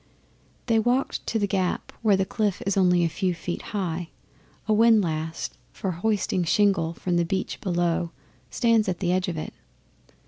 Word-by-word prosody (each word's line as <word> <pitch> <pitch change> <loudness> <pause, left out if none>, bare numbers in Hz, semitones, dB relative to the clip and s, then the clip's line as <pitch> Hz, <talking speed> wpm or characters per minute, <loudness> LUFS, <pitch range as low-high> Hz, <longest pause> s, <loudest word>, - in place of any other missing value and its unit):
They 230 -2 +3
walked 245 +4 0
to 225 - 0
The 205 - +1
Gap, 190 -2 -1
where 210 -4 +4
the 190 - +1
cliff 205 -1 -1
is 195 - +1
only 180 -2 +4
a - - +3
few 180 +2 -1
feet 175 0 -4
high. 175 -4 -3 0.6
A 215 - +3
windlass 180 -8 +2 0.2
for 190 - -3
hoisting 190 0 0
shingle 175 -2 +2
from 175 0 -1
the 170 - +3
beach 190 +3 -3
below 175 -2 0 0.4
stands 230 -4 +2
at 180 - -1
the 175 -1 0
edge 185 0 +1
of 170 -3 -3
it. 155 - -5
185 Hz, 170 wpm, -25 LUFS, 175-210 Hz, 0.6 s, where